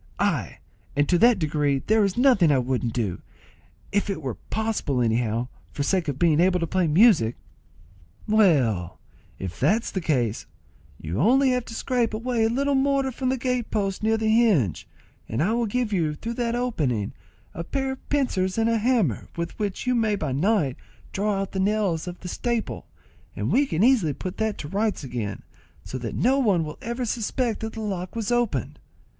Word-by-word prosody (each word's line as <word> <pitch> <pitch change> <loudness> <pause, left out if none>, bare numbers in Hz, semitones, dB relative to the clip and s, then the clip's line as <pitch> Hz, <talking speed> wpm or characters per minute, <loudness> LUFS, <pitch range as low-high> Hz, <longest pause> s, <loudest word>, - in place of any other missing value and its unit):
Ay, - - -1 0.4
and 145 +1 +2
to 175 - +3
that 235 0 +6
degree 150 -4 +1
that - - -8
there 220 0 +3
is 195 0 0
nothing 245 - +5
I 140 - +4
wouldn't 125 -2 -1
do, 100 -8 -2 0.7
if 205 +1 0
it 195 - -2
were 135 -5 -4
possible 220 - -2
anyhow, 115 0 0 0.2
for 145 - -3
sake 180 +3 0
of 140 -2 -2
being 160 -1 +3
able 180 +1 +3
to 165 - 0
play 180 +1 +1
music." 155 - +5 0.9
"Well, 130 - +2 0.4
if 95 -2 -6
that's 210 - +2
the 190 - -2
case, 125 -9 -1 0.5
you 80 +4 -4
have 165 - +3
only 260 0 +4
to 225 - -10
scrape 235 -3 0
away 230 0 0
a - - +2
little 280 +4 0
mortar 275 0 +2
from 255 +1 -2
the 260 - 0
gate 250 -2 -1
post 195 -2 -1
near 220 +1 +2
the 220 0 -1
hinge, 215 - +2 0.4
and 110 - -2
I 210 +6 +1
will 235 -1 0
give 235 0 -1
you, 160 -5 0
through 230 +9 -5
that 235 0 -1
opening, 145 - -1 0.4
a 170 - -5
pair 270 +8 -2
of 265 - -10
pincers 195 -10 0
and 225 0 +2
a 230 - +2
hammer, 215 - +1
with 170 +4 -4
which 205 +1 -3
you 250 - +2
may 220 -3 +2
by 155 -8 -3
night 150 - +1 0.3
draw 200 0 0
out 195 - -3
the 190 - -3
nails 190 -4 0
of 175 0 -7
the 180 - -7
staple, 235 +4 -3 0.5
and - - -2
we 280 +2 +3
can 165 0 0
easily 225 - +4
put 180 +6 -6
that 220 -1 -1
to 145 - -6
rights 205 +2 -1
again, 120 -6 -4 0.4
so 130 - -6
that 120 -2 -5
no 265 +4 +3
one 200 -10 +2
will 150 -1 -7
ever 235 +2 -3
suspect 230 +1 -1
that 220 0 -5
the 225 - -6
lock 190 -3 -4
was 225 -1 -2
opened. 235 - -1
200 Hz, 195 wpm, -25 LUFS, 150-235 Hz, 0.9 s, that